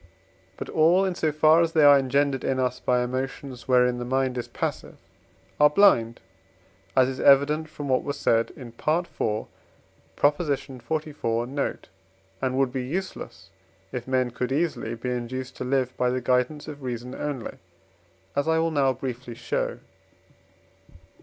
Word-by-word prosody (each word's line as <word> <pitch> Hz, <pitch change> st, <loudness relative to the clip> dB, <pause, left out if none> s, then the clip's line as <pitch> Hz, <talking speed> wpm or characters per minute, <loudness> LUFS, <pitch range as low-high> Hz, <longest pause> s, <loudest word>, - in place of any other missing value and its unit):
But -, -, -6 dB
all, 170 Hz, +5 st, +4 dB
in 190 Hz, -, -1 dB
so 160 Hz, -3 st, 0 dB
far 155 Hz, +2 st, +5 dB
as 165 Hz, -1 st, 0 dB
they 155 Hz, -, +4 dB
are 145 Hz, -1 st, +8 dB
engendered 140 Hz, 0 st, +1 dB
in 130 Hz, -1 st, 0 dB
us 125 Hz, -1 st, 0 dB
by 125 Hz, -1 st, +1 dB
emotions 130 Hz, 0 st, -5 dB
wherein 125 Hz, -1 st, +3 dB
the -, -, -3 dB
mind 130 Hz, +1 st, 0 dB
is 120 Hz, -, -4 dB
passive, -, -, -4 dB, 0.6 s
are 150 Hz, 0 st, +7 dB
blind 125 Hz, -, +4 dB, 0.8 s
(as 130 Hz, -1 st, +6 dB
is 130 Hz, 0 st, -4 dB
evident 150 Hz, +3 st, +4 dB
from 145 Hz, -2 st, -7 dB
what 130 Hz, -1 st, +2 dB
was 140 Hz, -1 st, -4 dB
said 115 Hz, -4 st, +2 dB
in 125 Hz, -3 st, -9 dB
IV. 115 Hz, -, -20 dB, 1.4 s
xliv. 145 Hz, -4 st, -1 dB
note), 140 Hz, +1 st, -3 dB, 0.5 s
and 130 Hz, 0 st, -1 dB
would 135 Hz, -2 st, +1 dB
be 130 Hz, -2 st, -2 dB
useless, 125 Hz, -, -6 dB, 0.4 s
if 125 Hz, -1 st, -5 dB
men 130 Hz, -1 st, +1 dB
could 125 Hz, +1 st, -3 dB
easily, 145 Hz, -6 st, -1 dB
be 125 Hz, +2 st, -4 dB
induced 125 Hz, +2 st, -4 dB
to -, -, -4 dB
live 130 Hz, -1 st, 0 dB
by 125 Hz, -, +2 dB
the 130 Hz, +1 st, 0 dB
guidance 125 Hz, +5 st, 0 dB
of 145 Hz, -2 st, -8 dB
reason 125 Hz, 0 st, -5 dB
only, 145 Hz, -5 st, -5 dB, 0.8 s
as 145 Hz, +2 st, 0 dB
I 160 Hz, 0 st, +3 dB
will 165 Hz, 0 st, +1 dB
now 135 Hz, -3 st, +2 dB
briefly, 125 Hz, -2 st, -6 dB
show. -, -, -2 dB
130 Hz, 155 wpm, -25 LUFS, 125-150 Hz, 1.4 s, are